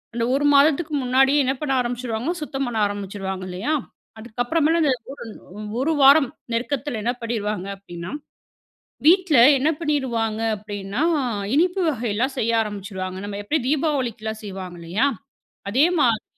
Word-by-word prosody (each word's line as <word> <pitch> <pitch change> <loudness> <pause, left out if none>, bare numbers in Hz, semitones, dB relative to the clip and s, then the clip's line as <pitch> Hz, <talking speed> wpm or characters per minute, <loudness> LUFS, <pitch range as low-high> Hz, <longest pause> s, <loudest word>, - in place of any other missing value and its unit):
அந்த 230 - 0
1 290 +1 +1
மாதத்துக்கு 300 +2 +3
முன்னாடியே 270 +3 +4
என்ன 265 - +1
பண்ண 285 -3 -1
ஆரம்பிச்சிருவாங்க 240 +3 -2
சுத்தம் 275 -2 -3
பண்ண 230 -2 -3
ஆரம்பிச்சிருவாங்க 195 -2 -5
இல்லையா? 200 +13 -2 0.5
அதுக்கப்புறமேல 270 +9 0
அந்த 285 - +3 0.2
ஒரு 280 - -9
ன் 210 +3 -10
1 315 - +1
வாரம் 275 0 +7 0.2
நெருக்கத்துல 255 0 -2
என்ன 240 - +1
பண்ணிருவாங்க 210 -4 -3
அப்டின்னா 175 -1 -8 1.0
வீட்ல 350 -4 +5 0.2
என்ன 290 +4 +1
பண்ணிருவாங்க 235 -8 -1 0.2
அப்படின்னா, 205 +2 -5 0.5
இனிப்பு 360 +5 +2
வகைலாம் 245 -1 -1
செய்ய 230 0 +1
ஆரம்பிச்சிருவாங்க. 190 -3 -5
நம்ம 205 0 -5
எப்டி 310 +10 +1
தீபாவளிக்குலாம் 250 -8 -1
செய்வாங்க 185 -3 -7
இல்லையா? 185 +11 0 0.6
அதே 260 +9 +4
மாதிரி 230 -5 +2
240 Hz, 130 wpm, -22 LUFS, 205-285 Hz, 1.0 s, வாரம்